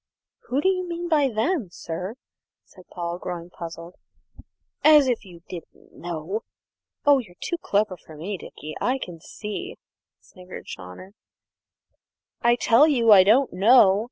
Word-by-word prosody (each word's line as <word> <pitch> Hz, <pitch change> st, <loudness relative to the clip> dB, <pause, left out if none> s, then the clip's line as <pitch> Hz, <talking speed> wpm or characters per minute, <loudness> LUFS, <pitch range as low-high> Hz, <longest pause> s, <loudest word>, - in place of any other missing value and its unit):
"Who 270 Hz, +3 st, 0 dB
do 375 Hz, -, +1 dB
you 365 Hz, -2 st, 0 dB
mean 345 Hz, +1 st, -4 dB
by 295 Hz, -4 st, +3 dB
them, 240 Hz, -, -1 dB
sir?" 180 Hz, +5 st, -6 dB, 0.5 s
said 185 Hz, -2 st, -18 dB
Paul, 175 Hz, -1 st, -5 dB
growing 175 Hz, -1 st, -6 dB
puzzled. 170 Hz, +1 st, -9 dB, 0.9 s
"As 300 Hz, -3 st, +7 dB
if 245 Hz, -3 st, 0 dB
you 175 Hz, -4 st, -14 dB
didn't 175 Hz, -3 st, -11 dB
know! 175 Hz, +5 st, -5 dB, 0.6 s
Oh, 285 Hz, -1 st, +6 dB
you're 205 Hz, -8 st, -10 dB
too 345 Hz, -, -3 dB
clever 205 Hz, -, 0 dB
for 160 Hz, -1 st, -15 dB
me, 190 Hz, +7 st, -4 dB
Dickie, 155 Hz, -3 st, -9 dB
I 255 Hz, +2 st, +1 dB
can 175 Hz, -9 st, -8 dB
see," 215 Hz, -, -7 dB, 0.4 s
sniggered 180 Hz, -1 st, -12 dB
Chawner. 90 Hz, -, -10 dB, 1.3 s
"I 240 Hz, 0 st, +4 dB
tell 240 Hz, +5 st, +5 dB
you 240 Hz, -7 st, +3 dB
I 195 Hz, -3 st, +9 dB
don't 240 Hz, +7 st, +3 dB
know!" 200 Hz, 0 st, +6 dB
205 Hz, 145 wpm, -24 LUFS, 175-265 Hz, 1.3 s, I